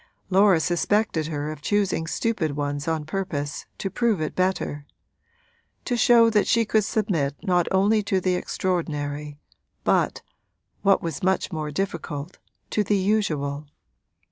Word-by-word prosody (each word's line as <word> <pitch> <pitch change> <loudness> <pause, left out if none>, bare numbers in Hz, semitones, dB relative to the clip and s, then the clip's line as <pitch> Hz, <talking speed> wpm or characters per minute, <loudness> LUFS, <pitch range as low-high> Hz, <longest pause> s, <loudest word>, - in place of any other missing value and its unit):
Laura 190 -2 +5
suspected 175 0 +1
her 150 -1 -3
of 155 - -9
choosing 195 -1 0
stupid 165 -7 -1
ones 145 0 -3
on 160 -2 -1
purpose 155 -4 -4
to - - -3
prove 230 -6 +1
it 155 - -2
better 180 -6 -1 1.0
to 245 - 0
show 235 0 +6
that 215 -2 +2
she 230 0 +3
could 215 0 +2
submit 185 - 0
not 180 -3 +2
only 205 +3 +3
to 195 -2 0
the 185 0 +1
extraordinary 150 -6 -2 0.5
but, - - +1 0.6
what 195 -1 +3
was 165 -4 -4
much 190 +1 +1
more 155 -3 -3
difficult, 155 -2 -4 0.3
to 210 - +2
the 205 +1 +1
usual. 155 -8 0
180 Hz, 140 wpm, -24 LUFS, 150-205 Hz, 1.0 s, show